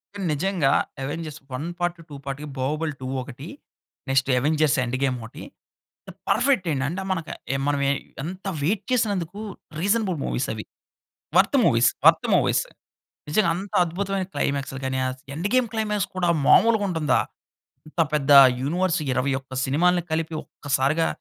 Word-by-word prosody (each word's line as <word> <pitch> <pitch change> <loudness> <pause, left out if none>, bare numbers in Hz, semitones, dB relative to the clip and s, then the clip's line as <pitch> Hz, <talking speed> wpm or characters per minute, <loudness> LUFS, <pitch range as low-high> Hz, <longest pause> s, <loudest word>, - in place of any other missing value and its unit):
కానీ, 200 -2 -4
నిజంగా, 170 -3 +1 0.3
'Avengers 155 +2 -5
1 145 +6 -4
part, 175 0 -1
2 145 - -8
part' 140 +1 -5
కి, - - -6
'బాహుబలి-2' 145 -1 -2
ఒకటి, 135 +5 -10 0.6
నెక్స్ట్ 135 0 +2
'అవెంజర్స్ 150 +2 +2
ఎండ్ 125 0 -2
గేమ్' 130 -2 +1
ఓటి, 115 - -10 0.7
ద - - -7 0.2
పర్ఫెక్ట్ 255 -10 +2
అండి. 135 -3 -1
అంటే 180 +5 -4
మనక 165 -4 -2 0.3
ఎ - - +1
మనవే 140 -1 +1 0.3
ఎంత 185 +5 -7 0.2
వెయిట్ 195 +7 0
చేసినందుకు, 205 -6 0 0.4
రీసనబుల్ 200 -1 +1
మూవీస్ 130 - -1
అవి. 110 -1 -6 0.7
వర్త్ - - +4
మూవీస్, - - +4 0.2
వర్త్ - - +6
మూవీస్ - - +2 0.7
నిజంగ 200 +6 +3
అంత 190 +2 -7
అద్భుతమైన 190 +2 -2
క్లైమాక్స్‌లు 140 -1 -2
గానీ, 130 0 -1
అస్ 130 0 -6
'ఎండ్ 170 +6 -1
గేమ్' 250 -3 +2
క్లైమాక్స్ 210 -3 -1
కూడా 175 -2 +1 0.2
మామూలుగుంటుందా? 200 -9 +4 0.7
ఇంత 160 +2 -1
పెద్ద 145 -2 +1 0.3
యూనివర్స్ 175 +5 0
21 130 +1 -2
సినిమాల్ని 175 +6 +2
కలిపి, 160 +1 -1
ఒక్కసారిగా, 145 +3 0
160 Hz, 140 wpm, -24 LUFS, 140-185 Hz, 0.7 s, వర్త్